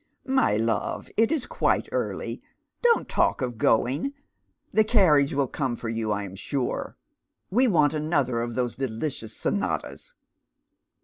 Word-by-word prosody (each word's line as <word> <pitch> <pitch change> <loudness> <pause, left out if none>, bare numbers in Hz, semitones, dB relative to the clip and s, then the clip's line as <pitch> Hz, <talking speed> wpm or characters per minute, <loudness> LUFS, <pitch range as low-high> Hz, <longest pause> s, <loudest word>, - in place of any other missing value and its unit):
" - - -49
My 265 - +2
love, 115 0 -1
it 225 +1 +3
is 310 -6 0
quite - - 0
early; - - -3 0.4
don't 475 -1 +3
talk - - +1
of 120 -3 -4
going; 135 - +2 0.6
the 220 - +5
carriage 175 - +4
will 140 0 +1
come 130 -2 -2
for 115 - -5
you, 110 -1 -2
I 100 0 -1
am 95 -1 -8
sure. 130 +6 -3 0.5
We 250 +6 +4
want 160 -8 +3
another 145 -6 0
of 120 0 -4
those 125 -2 -1
deli 135 +2 -2
cious 110 -4 -8
sonatas. - - -2
135 Hz, 150 wpm, -26 LUFS, 115-180 Hz, 0.6 s, the